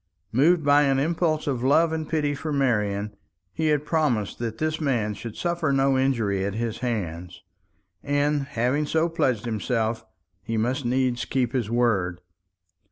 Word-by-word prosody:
Moved 155 +6 +3
by 145 0 +5
an 135 -2 +2
impulse 155 +2 0
of 130 -4 -1
love 160 +5 +3
and 160 -1 -3
pity 150 -2 0
for 155 +2 -4
Marian, 105 -7 0 0.4
he 160 -1 -1
had 150 -1 +1
promised 130 - 0
that 115 -2 -4
this 155 +3 -2
man 120 -8 0
should 110 +1 -8
suffer 170 -4 0
no 135 0 +3
injury 115 -8 +1
at 100 0 -2
his 115 -1 -3
hands; 90 -8 -4 0.6
and, 145 0 0
having 135 +3 0
so 160 +2 +2
pledged 130 -9 0
himself, 110 0 -1 0.4
he 115 +3 -3
must 125 +5 -1
needs 125 0 +1
keep 125 -3 -1
his 120 -5 -1
word. 105 -7 +1
130 Hz, 160 wpm, -25 LUFS, 110-150 Hz, 0.6 s, by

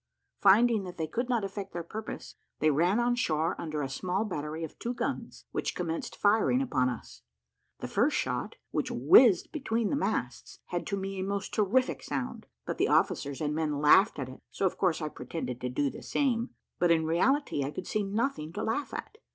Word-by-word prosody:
Finding 215 +2 +5
that 180 - -8
they 160 - -1
could 240 +11 -3
not 235 -4 +1
effect 195 0 -5
their 170 - -3
purpose, 215 +6 -7 0.2
they 155 0 +3
ran 175 +9 +3
on 240 0 +2
shore 165 -9 0
under 155 -3 -3
a - - -1
small 185 +9 -1
battery 155 -4 -4
of 160 - -7
two 240 +1 -3
guns, 245 +4 -4
which - - -2
commenced 165 -2 -3
firing 220 +4 +3
upon 130 - +1
us. 120 - -8 0.6
The - - -3
first - - +2
shot, - - -2 0.2
which - - -1
whizzed 180 - +6
between 230 -7 -1
the - - +2
masts, 285 - -2
had - - -3
to 200 - -1
me 195 0 -4
a - - -1
most 200 +1 -3
terrific 220 +5 +2
sound; 135 -3 -4 0.2
but - - -4
the - - +3
officers 140 +1 +1
and 150 -1 0
men 155 -2 -1
laughed 150 +9 +5
at 135 -3 -3
it, 130 - -11
so 195 - -2
of 185 - +1
course 175 -4 +1
I - - -1
pretended 125 -3 -5
to 125 - -2
do 140 +2 0
the - - -10
same, 245 -4 0 0.3
but 175 - +3
in 165 -1 +3
reality 175 - +2
I 135 - -2
could 180 - -6
see 215 - -1
nothing 200 - -1
to 210 - -3
laugh 255 +6 -2
at. 435 - -7
185 Hz, 205 wpm, -29 LUFS, 155-225 Hz, 0.6 s, whizzed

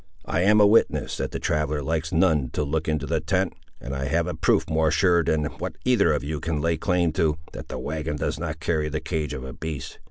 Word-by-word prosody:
I 85 - 0
am 105 +3 +5
a 105 - +7
witness 105 +3 +3
that - - -2
the - - -4
traveller 75 -1 -1
likes 80 +2 -1
none 80 -6 +2
to - - 0
look 80 +2 -2
into 75 -2 0
the 80 +1 0
tent, 90 +3 0 0.3
and 65 - -6
I 70 0 -2
have 80 +4 +1
a - - -3
proof - - +2
more 80 0 +2
sure 85 +1 +3
than 75 -2 +1
what - - -4
either - - +4
of - - 0
you 75 +1 -3
can 80 -1 -2
lay 85 +2 +1
claim 85 +1 +1
to, 80 0 +1
that - - -8
the - - -5
wagon 75 +3 -3
does 75 +1 -2
not 80 -1 -4
carry 80 -1 0
the 75 +1 -2
cage 75 -2 -3
of 65 - -6
a 65 -1 -7
beast. 75 -3 -6
80 Hz, 245 wpm, -25 LUFS, 75-85 Hz, 0.3 s, a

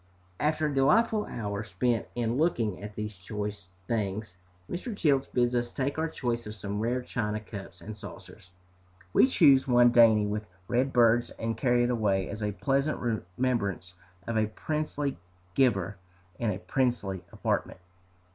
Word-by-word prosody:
After 155 +1 +1
a 150 - 0
delightful 210 +11 +3
hour 100 -2 -3
spent 110 +2 0
in 120 -1 0
looking 120 - +1
at 105 0 -8
these 105 -1 -4
choice 105 0 -5 0.2
things, 105 -3 -2 0.3
Mr. 200 +4 -5
Childs 140 -6 +2
bids 120 -1 +1
us 120 -1 0
take 140 +3 -2
our 160 - +1
choice 120 -5 -2
of 105 - -7
some 100 0 -4
rare 120 +3 0
china 105 -3 -2
cups 100 -2 -9
and 110 0 -7
saucers. 100 -4 -11 0.6
We - - +6
choose 140 - +5
one 120 -1 +6
dainty 115 -3 +6
with 105 +1 -3 0.2
red 125 +3 +1
birds, 120 -1 +4
and 115 0 -3
carry 120 -2 +2
it 120 - +1
away 100 -5 +1
as 105 +2 -6
a 105 0 0
pleasant 140 +7 0 0.4
remembrance 100 -8 -1 0.3
of 115 -1 -2
a 110 - +2
princely 145 - -3 0.3
giver, 100 -7 +2 0.4
in 115 - 0
a 95 - -1
princely 105 -6 -1
apartment. - - -1
115 Hz, 155 wpm, -29 LUFS, 105-130 Hz, 0.6 s, We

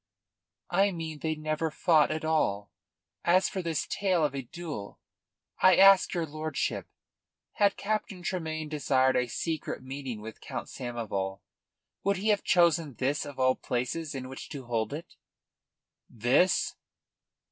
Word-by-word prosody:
"I 195 +3 +4
mean 160 -3 -5
they 155 0 -1
never 155 +1 -1
fought 155 0 +3
at 155 0 -3
all. 105 -11 0 0.5
As 185 +2 +4
for 190 - -3
this 165 -3 -1
tale 185 -5 +1
of 145 - -1
a 135 - -3
duel, 145 -6 -7 0.6
I 185 -1 +7
ask 195 0 +7
your 170 -2 0
lordship: 155 +1 -3 0.7
Had 200 -2 +3
Captain 200 -3 -2
Tremayne 160 -4 -3
desired 135 -3 +2
a 125 0 +2
secret 160 +2 -3
meeting 130 -3 -5
with 110 +1 -9
Count - - -6
Samoval, 105 -6 -4 0.6
would 200 -1 +2
he 205 +4 0
have 205 -1 +3
chosen 165 -6 +3
this 140 +5 -1
of 145 - -9
all 130 0 +4
places 140 +6 -3
in 130 -1 -5
which 135 +1 -8
to 140 -4 -7
hold 115 -2 -1
it?" 155 +4 -8 0.9
"This?" 120 - +2
155 Hz, 145 wpm, -29 LUFS, 130-170 Hz, 0.9 s, I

